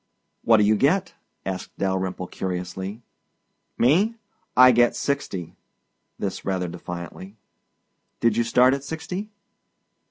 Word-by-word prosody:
"What 115 -1 +6
do 105 - +4
you 105 +1 +4
get?" 170 - +2 0.3
asked 95 -1 -5
Dalyrimple 95 -1 -1
curiously. 95 +4 -4 0.7
"Me? 185 - +3 0.4
I 130 0 +9
get 120 0 +4
sixty." 100 - -3 0.6
This - - -4
rather 95 -2 -1
defiantly. 90 +3 -8 0.8
"Did 115 -2 +3
you 120 - +2
start 125 +3 +4
at 140 0 -3
sixty?" 180 +7 -5
110 Hz, 115 wpm, -24 LUFS, 95-135 Hz, 0.8 s, I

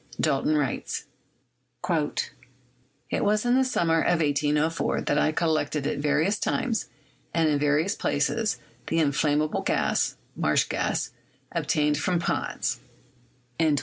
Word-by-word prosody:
Dalton 150 0 +2
writes: 140 -4 -2 0.8
"It 130 -5 -4
was 210 +2 +2
in 245 - +3
the 265 +1 +4
summer 170 -10 +2
of 175 0 +2
1804 150 +1 +1
that - - +1
I 155 - +3
collected 155 -3 0
at 145 - -1
various 155 +7 +1
times 230 -4 -1 0.5
and 165 -1 +3
in 150 -2 +2
various 150 +7 +2
places 225 -1 0 0.3
the 165 - 0
inflammable 150 0 +1
gas - - +1 0.2
[marsh - - +2
gas] - - -1 0.4
obtained 150 -1 +1
from 175 +3 +1
ponds." 170 - -1
155 Hz, 115 wpm, -26 LUFS, 145-170 Hz, 0.8 s, the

